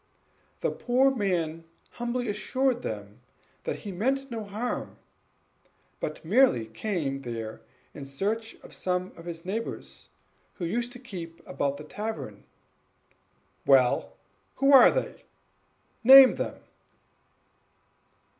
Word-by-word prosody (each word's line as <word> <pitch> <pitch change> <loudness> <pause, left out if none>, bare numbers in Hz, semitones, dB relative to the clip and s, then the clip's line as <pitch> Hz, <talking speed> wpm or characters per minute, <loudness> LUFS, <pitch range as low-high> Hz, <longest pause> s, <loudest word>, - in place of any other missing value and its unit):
The - - 0
poor 260 +2 +2
man 170 -7 -1 0.3
humbly 240 0 -3
assured 245 +4 0
him 105 -1 -6 0.4
that - - -3
he 200 - -4
meant 265 +8 -1
no 225 -2 -4
harm, 215 +5 -4 1.0
but 155 +1 -5
merely 210 - +4
came 135 - -3
there 115 -3 -6 0.3
in 145 - -8
search 210 +11 -3
of - - -13
some 180 0 -2
of 165 - -12
his 170 0 -7
neighbors, 220 +5 -5 0.5
who 175 - -4
used 235 +7 -2
to - - -9
keep 170 -9 -8
about 140 0 -2
the 150 - -9
tavern. 215 +8 -6 1.2
"Well 125 -7 +4 0.4
who 275 +1 +3
are 270 - +10
they? - - -3 0.8
name 265 +2 +10
them." - - -4
195 Hz, 115 wpm, -27 LUFS, 150-240 Hz, 1.2 s, are